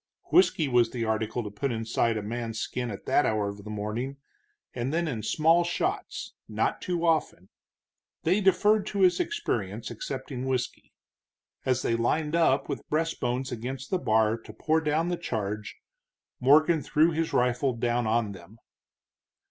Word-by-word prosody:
Whisky 330 Hz, -, +4 dB
was 120 Hz, -3 st, +3 dB
the 115 Hz, -1 st, -3 dB
article 110 Hz, +2 st, -1 dB
to 105 Hz, -, -6 dB
put 125 Hz, +7 st, -2 dB
inside 115 Hz, 0 st, 0 dB
a 105 Hz, -, -3 dB
man's 115 Hz, +1 st, -4 dB
skin 125 Hz, -1 st, -3 dB
at 100 Hz, -, -7 dB
that 135 Hz, +2 st, +3 dB
hour 105 Hz, -2 st, 0 dB
of 100 Hz, 0 st, -9 dB
the 105 Hz, -, -9 dB
morning, 110 Hz, +6 st, -3 dB, 0.6 s
and 125 Hz, +2 st, -2 dB
then 170 Hz, +1 st, 0 dB
in 120 Hz, -7 st, -3 dB
small 165 Hz, +8 st, +3 dB
shots, 175 Hz, -, -3 dB, 0.2 s
not -, -, -1 dB
too 175 Hz, -2 st, -1 dB
often. 155 Hz, -, 0 dB, 0.7 s
They 185 Hz, +6 st, +2 dB
deferred 205 Hz, +2 st, +3 dB
to 200 Hz, -2 st, -2 dB
his 180 Hz, -1 st, +5 dB
experience, 390 Hz, +4 st, -2 dB
accepting 130 Hz, -, -5 dB
whisky. 130 Hz, -2 st, -3 dB, 0.8 s
As 130 Hz, -1 st, +1 dB
they 115 Hz, -, +1 dB
lined 150 Hz, +7 st, 0 dB
up 140 Hz, -5 st, +3 dB
with -, -, -3 dB
breastbones 135 Hz, -5 st, -1 dB
against 125 Hz, +3 st, -5 dB
the 185 Hz, -, +1 dB
bar 110 Hz, -3 st, +2 dB
to -, -, -12 dB
pour 160 Hz, +1 st, +1 dB
down 160 Hz, +2 st, +1 dB
the 175 Hz, -, -1 dB
charge, 105 Hz, -9 st, -4 dB, 0.6 s
Morgan 155 Hz, +5 st, +5 dB
threw 155 Hz, +5 st, +3 dB
his 160 Hz, 0 st, -1 dB
rifle 125 Hz, +2 st, +2 dB
down 120 Hz, 0 st, 0 dB
on 110 Hz, -1 st, +1 dB
them. 95 Hz, +3 st, -13 dB
125 Hz, 160 wpm, -27 LUFS, 115-160 Hz, 0.8 s, his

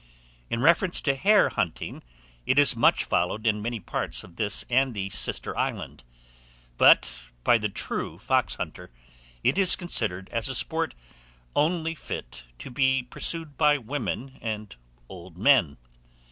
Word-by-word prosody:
In 115 Hz, -, -2 dB
reference 170 Hz, +3 st, +3 dB
to 140 Hz, -, +1 dB
hare 205 Hz, +9 st, +4 dB
hunting, 85 Hz, -3 st, -4 dB, 0.5 s
it 130 Hz, -, +2 dB
is 145 Hz, -3 st, +6 dB
much 115 Hz, -, +3 dB
followed 95 Hz, +6 st, -1 dB
in 105 Hz, -2 st, +1 dB
many 115 Hz, +1 st, -3 dB
parts -, -, -4 dB
of 85 Hz, -, -15 dB
this 105 Hz, -2 st, 0 dB
and 130 Hz, 0 st, +1 dB
the 95 Hz, -1 st, -4 dB
sister -, -, -2 dB
island; -, -, -4 dB, 0.8 s
but, 60 Hz, +1 st, +4 dB, 0.2 s
by 120 Hz, -, +4 dB
the 105 Hz, 0 st, -2 dB
true -, -, -2 dB
foxhunter, -, -, -2 dB, 0.5 s
it 195 Hz, -, +2 dB
is 185 Hz, -2 st, +5 dB
considered 100 Hz, -, -2 dB
as 115 Hz, -2 st, -1 dB
a -, -, -1 dB
sport -, -, 0 dB, 0.6 s
only 165 Hz, +1 st, +1 dB
fit -, -, -8 dB
to -, -, -9 dB
be 130 Hz, 0 st, +1 dB
pursued 165 Hz, -4 st, -1 dB
by 150 Hz, -1 st, +4 dB
women 135 Hz, 0 st, -5 dB
and 110 Hz, -, -5 dB, 0.3 s
old 90 Hz, -2 st, -12 dB
men. 110 Hz, -, +3 dB
120 Hz, 145 wpm, -26 LUFS, 100-145 Hz, 0.8 s, is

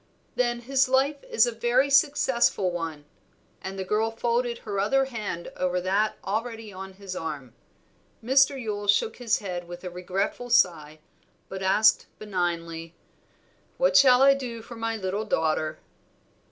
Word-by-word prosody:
"Then 240 Hz, -1 st, 0 dB
his 265 Hz, +2 st, +1 dB
life 275 Hz, +2 st, +1 dB
is 470 Hz, -, +3 dB
a 240 Hz, -, -1 dB
very 240 Hz, +4 st, +1 dB
successful 265 Hz, -, +3 dB
one;" 165 Hz, -4 st, -5 dB, 0.6 s
and 190 Hz, +1 st, -6 dB
the 190 Hz, -, -3 dB
girl 210 Hz, +4 st, 0 dB
folded 235 Hz, +1 st, -1 dB
her 200 Hz, -2 st, -3 dB
other 270 Hz, +7 st, +2 dB
hand 215 Hz, -9 st, -5 dB
over 180 Hz, 0 st, -1 dB
that 195 Hz, +4 st, 0 dB
already 225 Hz, +1 st, -4 dB
on 190 Hz, +1 st, -8 dB
his 190 Hz, -1 st, -8 dB
arm. 145 Hz, -8 st, -6 dB, 0.7 s
Mr. 270 Hz, +2 st, +4 dB
Yule 205 Hz, -3 st, -4 dB
shook 200 Hz, +2 st, +2 dB
his 235 Hz, -2 st, +1 dB
head 180 Hz, -4 st, -6 dB
with 175 Hz, +1 st, -9 dB
a 180 Hz, -, -6 dB
regretful 190 Hz, +7 st, -3 dB
sigh, 165 Hz, -10 st, +2 dB, 0.5 s
but 190 Hz, 0 st, -6 dB
asked 195 Hz, +3 st, +3 dB
benignly 170 Hz, -4 st, -3 dB, 0.8 s
"What -, -, +2 dB
shall 260 Hz, -2 st, +7 dB
I 275 Hz, 0 st, +7 dB
do 240 Hz, -4 st, -6 dB
for 235 Hz, -, -10 dB
my 225 Hz, 0 st, -3 dB
little 195 Hz, +1 st, -3 dB
daughter?" 155 Hz, -6 st, -1 dB
215 Hz, 150 wpm, -26 LUFS, 180-245 Hz, 0.8 s, shall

